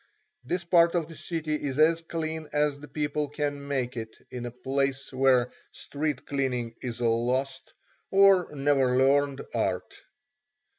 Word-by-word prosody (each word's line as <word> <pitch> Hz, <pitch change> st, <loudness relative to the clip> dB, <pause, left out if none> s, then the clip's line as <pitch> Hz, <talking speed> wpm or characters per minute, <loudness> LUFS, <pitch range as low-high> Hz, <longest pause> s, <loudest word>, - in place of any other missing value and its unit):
This 175 Hz, +8 st, -2 dB
part 170 Hz, 0 st, +4 dB
of 165 Hz, -3 st, 0 dB
the 165 Hz, -, -11 dB
city 160 Hz, -2 st, -3 dB
is 145 Hz, -3 st, -2 dB
as 165 Hz, +2 st, +4 dB
clean 160 Hz, -2 st, -4 dB
as 150 Hz, -1 st, +1 dB
the 150 Hz, -, -10 dB
people 150 Hz, 0 st, -2 dB
can 145 Hz, -1 st, -3 dB
make 130 Hz, -3 st, -2 dB
it 110 Hz, -2 st, -6 dB
in 120 Hz, -1 st, -5 dB
a -, -, -3 dB
place 135 Hz, +2 st, -2 dB
where 130 Hz, -1 st, +3 dB, 0.2 s
street 145 Hz, -2 st, -3 dB
cleaning 125 Hz, -4 st, -2 dB
is 120 Hz, -1 st, -5 dB
a 120 Hz, -, +2 dB
lost, 125 Hz, +4 st, -1 dB, 0.4 s
or 195 Hz, -2 st, +5 dB
never 135 Hz, -3 st, +2 dB
learned, 140 Hz, +1 st, +3 dB
art. -, -, -1 dB
140 Hz, 150 wpm, -27 LUFS, 130-155 Hz, 0.4 s, or